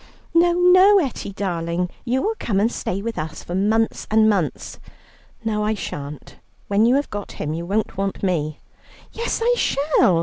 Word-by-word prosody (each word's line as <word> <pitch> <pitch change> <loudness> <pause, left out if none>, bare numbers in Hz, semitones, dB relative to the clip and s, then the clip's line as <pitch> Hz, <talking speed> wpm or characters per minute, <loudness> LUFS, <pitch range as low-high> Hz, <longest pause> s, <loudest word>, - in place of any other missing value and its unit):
"No, 345 +1 +4
no, 370 +3 +6
Etty 270 - -2
darling; 175 -3 -2 0.2
you 255 +2 0
will 440 - +1
come 200 -4 0
and 220 +4 +2
stay 195 -3 -3
with 230 0 -3
us 155 0 -6
for 175 - -7
months 215 +4 +1
and 220 0 +4
months." 195 -7 -1 0.7
"No, 210 -1 0
I 215 +1 0
shan't. 145 -6 -7 0.3
When 205 +3 +3
you 250 - +4
have 285 +1 -1
got 205 -1 -6
him 150 0 -4
you 170 +1 -5
won't 205 0 -1
want 195 0 -3
me." 155 -5 -1 0.5
"Yes, 465 0 -2
I 485 +1 +4
shall. 280 - +2
210 Hz, 175 wpm, -22 LUFS, 180-265 Hz, 0.7 s, no